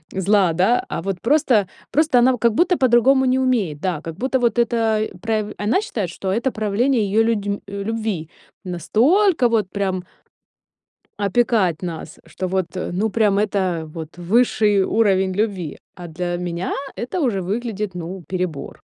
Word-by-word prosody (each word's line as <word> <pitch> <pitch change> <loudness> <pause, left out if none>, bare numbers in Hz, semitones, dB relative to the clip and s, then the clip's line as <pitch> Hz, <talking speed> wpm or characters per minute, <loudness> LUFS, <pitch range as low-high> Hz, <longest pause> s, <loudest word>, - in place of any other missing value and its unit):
зла, 190 -2 +3
да, 190 +9 +2
а - - -3
вот 190 -1 -3
просто, 245 -6 +3 0.3
просто 300 -4 +3
она 255 +2 +5
в - - -3
как 235 0 +2
будто 350 +6 +2
по-другому 265 +1 +4
не 255 +1 +2
умеет, 215 - 0
да, 175 -5 -2
как 165 -1 -7
будто 260 +2 0
вот 240 -1 +1
это 225 -2 +1
праев 215 -2 -1
она 215 - +1
считает, 210 - -3
что 190 - -7
это 235 +5 0
правление 225 +4 +1
её 210 +3 +2
людь 205 -3 -1
любви, 200 -5 -3 0.4
настолько 250 - +2
вот 215 -5 +1
прям 190 -3 -2 1.2
опекать 200 -4 +1
нас, 165 -3 -6
что 185 +3 -4
вот, 190 -2 0 0.3
ну, 210 +4 0
прям 205 -2 +2
это 185 -6 -1
вот 165 0 -8
высший 210 0 +2
уровень 190 -4 +2
любви, 195 -7 -2 0.2
а 175 -1 -9
для 175 +2 -3
меня 175 0 -3 0.2
это 250 +9 -3
уже 225 -9 0
выглядит, 210 +1 -3
ну, 180 +2 -6
перебор. 180 -6 -4
205 Hz, 155 wpm, -21 LUFS, 185-235 Hz, 1.2 s, она